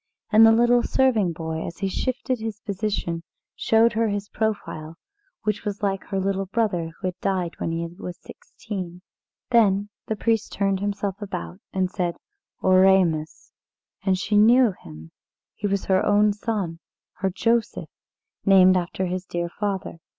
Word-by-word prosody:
And 220 0 +7
the 225 - +8
little 240 +2 +4
serving 235 -10 +2
boy, 160 0 -4
as 170 - -8
he 195 - -1
shifted 255 +4 -2
his 220 -2 -5
position, 200 -4 -2 0.3
showed 225 +1 +3
her 225 +1 +1
his 205 -1 -3
profile 185 -7 -3 0.5
it 210 -1 -1
was 205 0 -4
like 195 -1 -1
her 195 -1 -2
little 195 0 -1
brother 190 -6 0
who 185 +3 -6
had 180 - -11
died 185 -3 -1
when 165 - -2
he 165 +1 -2
was 175 +1 -8
sixteen. 185 -4 -8 0.5
Then 205 -3 +3 0.2
the 220 - -1
priest 225 0 0
turned 195 -1 0
himself 200 0 -3
about, 90 - -6
and 185 -1 -1
said, 175 -3 -2 0.5
"Oremus." 185 -4 +3 0.5
And 190 -1 +1
she 210 +2 0
knew 235 +2 +6
him 80 - -13 0.4
he 205 - -3
was 200 -1 -1
her 190 -1 +2
own 205 0 +4
son 200 -6 -3 0.4
her 195 - 0
Joseph, 230 +4 0 0.5
named 185 -1 +6
after 185 +1 -1
his 180 +1 -4
dear 175 0 -3
father. 195 -2 -4
195 Hz, 155 wpm, -24 LUFS, 180-215 Hz, 0.5 s, the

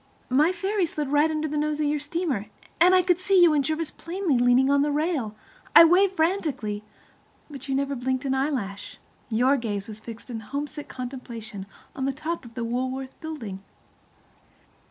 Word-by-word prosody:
My 300 +7 +4
ferry 380 +1 0
slid 300 -2 -3
right 295 +2 +3
under 310 0 -1
the 300 0 -2
nose 300 0 -1
of 305 - +1
your 295 0 +1
steamer, 295 - -2 0.3
and 360 +3 +6
I 365 - +5
could 355 -1 +2
see 380 0 +3
you 345 -3 +7
and 290 -2 +2
Jervis 315 +2 -2
plainly 345 -3 -2
leaning 245 +2 +4
on 280 0 +4
the 295 - +2
rail. 290 -8 -1 0.4
I - - +12
waved 375 +3 +4
frantically, 310 - -1 0.7
but 275 -1 -9
you 270 - +1
never 280 +1 0
blinked 260 +2 -2
an 265 - +1
eyelash. 260 -8 -2 0.3
Your 250 +5 +3
gaze 205 -5 -3
was 215 -1 -8
fixed 230 +3 -10
in 225 - -4
homesick 290 +6 -5
contemplation 235 -6 -7 0.2
upon 265 - -4
the 275 - 0
top 310 +2 -4
of 230 - -13
the 240 - -3
Woolworth 260 +3 -3
Building. 245 -12 -6
280 Hz, 180 wpm, -25 LUFS, 245-315 Hz, 0.7 s, I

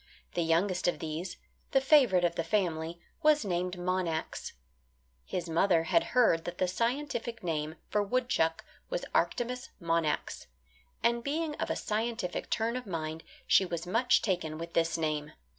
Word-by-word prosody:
The 175 - 0
youngest 175 +3 +2
of 175 - +1
these 160 +3 -4 0.4
the 270 - +6
favourite 265 - +5
of 170 - +1
the 165 - -1
family, 165 -3 -1 0.2
was 300 -6 +4
named 180 -1 -1
Monax. 175 -3 -2 0.7
His 180 -1 -3
mother 165 0 +3
had 335 - +3
heard 170 -10 +5
that 175 0 -5
the 185 - +1
scientific 235 +3 -2
name 155 -2 -2
for 210 - +1
woodchuck 205 -7 0 0.2
was - - -2
Arctomys 250 +1 0
Monax, 165 -3 -1 0.6
and 235 0 +2
being 310 +3 -1
of - - -2
a - - 0
scientific 220 -3 -2
turn 230 +1 0
of 250 -3 -5
mind, 160 -2 -4 0.2
she - - +5
was 170 -2 -4
much 235 +7 +3
taken 175 -6 -1
with 170 +1 -7
this 165 0 +2
name. 150 -2 -2
180 Hz, 155 wpm, -31 LUFS, 165-235 Hz, 0.7 s, the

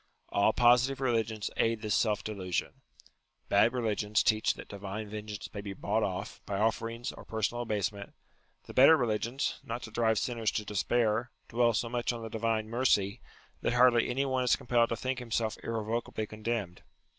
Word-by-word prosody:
All 100 +2 +3
positive 125 +3 +4
religions 115 -5 -1
aid 115 -1 +1
this 105 - 0
self 105 -2 +1
delusion. 95 -4 -3 0.7
Bad 105 +4 +5
religions 105 -4 0
teach 110 -1 +2
that - - -10
divine 100 +2 -6
vengeance 105 -1 -6
may 100 - -5
be 100 -1 -6
bought - - -1
off, - - -3
by 100 - -2
offerings, 115 +2 -1
or - - -12
personal 110 +2 -2
abasement; 105 -3 -3 0.5
the - - -11
better 140 +5 +8
religions, 120 +2 -1
not 120 +2 -5
to 110 - -8
drive 110 -1 +2
sinners 115 -2 0
to 105 - -2
despair, 110 +3 +1 0.2
dwell 120 -1 +2
so 115 - 0
much 120 +1 -1
on 120 -1 -6
the 115 - -5
divine 110 -1 -1
mercy, 115 -3 +1 0.4
that - - 0
hardly 125 -1 +5
any 135 +3 0
one 130 -1 0
is 125 - +4
compelled 120 -1 +2
to 115 - -1
think 130 +2 -3
himself 115 -2 -1
irrevocably 110 0 -3
condemned. 110 -4 -4
115 Hz, 170 wpm, -30 LUFS, 105-120 Hz, 0.7 s, better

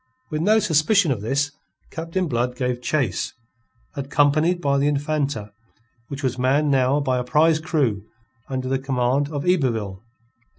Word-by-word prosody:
With 155 0 -1
no 210 +5 +4
suspicion 170 -1 +3
of 115 -6 -2
this, 140 +6 0 0.4
Captain 165 +3 -2
Blood 125 -2 -1
gave 125 -2 -2
chase, 130 -6 -1 0.6
accompanied 145 +5 +2
by 140 -4 +1
the 140 - +2
Infanta, 145 -7 -1 0.6
which 140 0 -7
was 130 -1 -1
manned 140 +4 +2
now 135 +1 +3
by 130 -3 0
a - - -2
prize 155 +5 +3
crew 145 - 0 0.5
under 130 -1 -3
the 135 0 0
command 135 +1 0
of 145 -2 -3
Yberville. 115 - 0
140 Hz, 145 wpm, -22 LUFS, 125-155 Hz, 0.6 s, no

